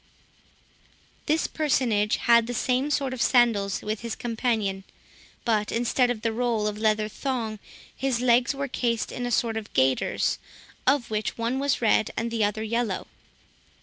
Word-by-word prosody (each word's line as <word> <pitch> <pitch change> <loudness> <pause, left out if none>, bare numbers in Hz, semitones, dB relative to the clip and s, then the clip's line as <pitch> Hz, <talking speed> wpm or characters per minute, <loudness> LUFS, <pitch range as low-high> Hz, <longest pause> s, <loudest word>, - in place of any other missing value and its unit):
This 315 +2 +2
personage 235 -8 +1
had 235 -1 +4
the 245 - -3
same 255 +4 +1
sort 275 -3 0
of 255 - -4
sandals 215 -5 +3
with 215 0 -2
his 230 -1 -4
companion, 220 -5 -1 0.6
but 215 -2 +1
instead 245 +2 +1
of 235 -3 -3
the 230 - +1
roll 230 -2 0
of 210 0 -2
leather 215 -1 +2
thong, 225 -2 -3 0.4
his 265 -3 -1
legs 245 +1 +3
were 280 0 -2
cased 235 -3 -1
in 245 0 -3
a - - -3
sort 225 -1 +1
of 215 -1 -6
gaiters, 130 0 +1 0.5
of 260 -4 +2
which 215 0 -2
one 235 +3 -1
was 275 -3 0
red 215 -1 +3
and 230 0 -2
the 225 -2 0
other 210 +1 0
yellow. 225 -3 -1
235 Hz, 160 wpm, -26 LUFS, 215-250 Hz, 0.6 s, had